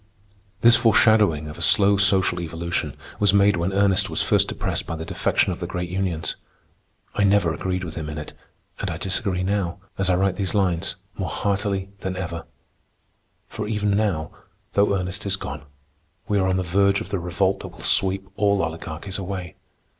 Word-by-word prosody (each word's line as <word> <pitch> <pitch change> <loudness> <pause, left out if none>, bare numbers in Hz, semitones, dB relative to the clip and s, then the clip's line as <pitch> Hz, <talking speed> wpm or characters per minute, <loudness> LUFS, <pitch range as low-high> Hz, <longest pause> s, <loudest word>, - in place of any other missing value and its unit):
This 120 0 +8
foreshadowing 105 -8 +4
of 75 - -9
a - - -7
slow 100 0 +5
social 95 -3 +3
evolution 85 +1 -3 0.2
was 100 -1 +4
made 100 0 +5
when 85 +3 0
Ernest 95 -1 +3
was - - -2
first - - +3
depressed - - -3
by 80 - -3
the 80 0 -6
defection 95 - +1
of - - -8
the 85 - -4
great 90 -1 -4
unions. 90 -4 -1 0.8
I 105 - +1
never 100 -4 +3
agreed 90 +1 -2
with 85 -3 -6
him 80 -2 -5
in 75 - -6
it, 75 - -7 0.5
and - - -2
I - - -3
disagree 95 -1 0
now, 95 -2 -1 0.2
as 95 -1 +2
I 90 - +4
write 95 0 +1
these 100 0 0
lines, 95 -1 0 0.2
more 95 - -2
heartily 100 -1 -1
than 95 -1 -4
ever; 85 -3 -5 1.0
for 105 -1 -5
even 105 -1 0
now, 100 -7 0 0.4
though 100 0 +3
Ernest 95 +2 -4
is 100 - +1
gone, 95 - -6 0.7
we 105 -1 +1
are 95 - +2
on 95 0 +1
the 95 - 0
verge 100 +3 +2
of 110 - -7
the 100 -2 -1
revolt 95 +3 0
that - - -7
will - - -13
sweep 95 0 +1
all 100 -3 +2
oligarchies 80 +4 -4
away. 90 -3 -5
95 Hz, 185 wpm, -23 LUFS, 85-100 Hz, 1.0 s, This